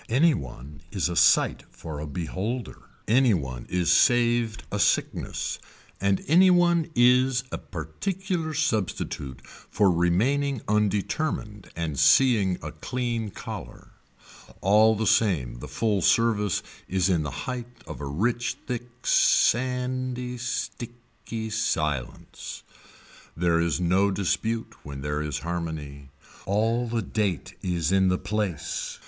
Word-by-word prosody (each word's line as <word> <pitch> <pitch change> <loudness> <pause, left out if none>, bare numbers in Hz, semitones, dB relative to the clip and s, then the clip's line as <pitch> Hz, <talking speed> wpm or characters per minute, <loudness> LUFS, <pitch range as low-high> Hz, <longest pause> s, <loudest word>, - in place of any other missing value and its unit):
Any 150 +8 +4
one 70 0 -8
is 95 -3 0
a 85 - -3
sight - - +4
for 80 -3 -8
a 75 - -5
beholder. 95 - -5 0.2
Any 120 -1 +4
one 65 -6 -5
is 90 -2 +1
saved 120 -2 +3
a - - -2
sickness. - - 0 0.4
And 100 0 +1
any 180 +6 +6
one 175 -2 +3
is 125 +1 +4
a - - -4
particular 160 - -4
substitute 110 - -2
for 100 -3 0
remaining 115 +11 +1
undetermined 105 +1 -1
and 80 -4 -3
seeing 105 -9 +4
a - - -5
clean 120 -3 -3
collar. - - -9 0.7
All 110 +3 +5
the 110 +1 -1
same 75 - +2
the - - -7
full 105 -4 0
service 105 -1 +2 0.2
is 95 -1 +1
in 90 -4 +2
the 75 - -3 0.2
height 125 -2 -4 0.2
of - - -8
a 70 - -4
rich 115 - -1
thick 120 0 -7
sandy 125 0 +1
sticky 115 -2 -5
silence. 75 - -3 0.7
There 85 0 +2
is 85 -1 0
no 95 +3 +3
dispute 110 +4 -1
when 70 -2 -7
there 75 +1 -2
is 75 -3 -3
harmony. 80 -5 -5 0.4
All 115 +5 +1
the 115 -1 -1
date 100 -4 -2
is 85 -3 -1
in 95 -1 +4
the 90 0 +2
place. 105 -7 -3
105 Hz, 125 wpm, -26 LUFS, 85-120 Hz, 0.7 s, any